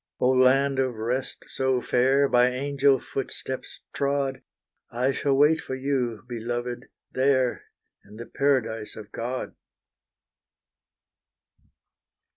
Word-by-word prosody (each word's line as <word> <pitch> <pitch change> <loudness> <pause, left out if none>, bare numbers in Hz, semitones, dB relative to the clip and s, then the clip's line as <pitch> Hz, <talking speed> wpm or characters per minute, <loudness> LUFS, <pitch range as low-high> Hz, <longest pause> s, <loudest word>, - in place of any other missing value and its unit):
Oh, 125 - +3
land 135 +1 +4
of 130 -2 0
rest 120 +4 -3
so 130 -1 0
fair 135 +3 +3
By 125 -1 +4
angel 140 +1 +2
footsteps 130 0 -6
trod, 140 -1 -1 0.5
I 125 +3 0
shall 135 0 0
wait 155 +3 +4
for 130 - -5
you, 130 -5 -2
beloved 120 +1 -4 0.2
there, 130 -1 +1 0.4
In 105 +1 -15
the 115 +2 -8
paradise 120 -7 0
of 110 -1 -10
God. 125 +2 -4
130 Hz, 105 wpm, -26 LUFS, 120-135 Hz, 0.5 s, land